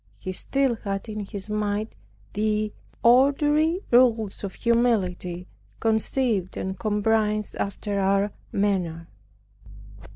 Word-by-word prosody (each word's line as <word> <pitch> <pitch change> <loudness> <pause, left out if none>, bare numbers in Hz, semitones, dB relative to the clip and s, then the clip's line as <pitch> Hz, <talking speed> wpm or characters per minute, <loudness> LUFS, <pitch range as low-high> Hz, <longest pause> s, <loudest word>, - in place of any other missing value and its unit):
He 185 - -5
still 265 +5 0
had 195 +1 -4
in 210 -2 -5
his 200 -2 -7
mind 210 0 -2 0.4
the 215 0 0 0.3
ordinary 295 +7 +4
rules 230 -5 +3
of 195 - -5
humility 190 -7 0 0.3
conceived 220 -3 0
and 190 0 -4
comprised 215 0 0
after 200 0 -2
our 195 +1 +2 0.2
manner. 180 -5 -1
210 Hz, 100 wpm, -25 LUFS, 195-235 Hz, 0.4 s, ordinary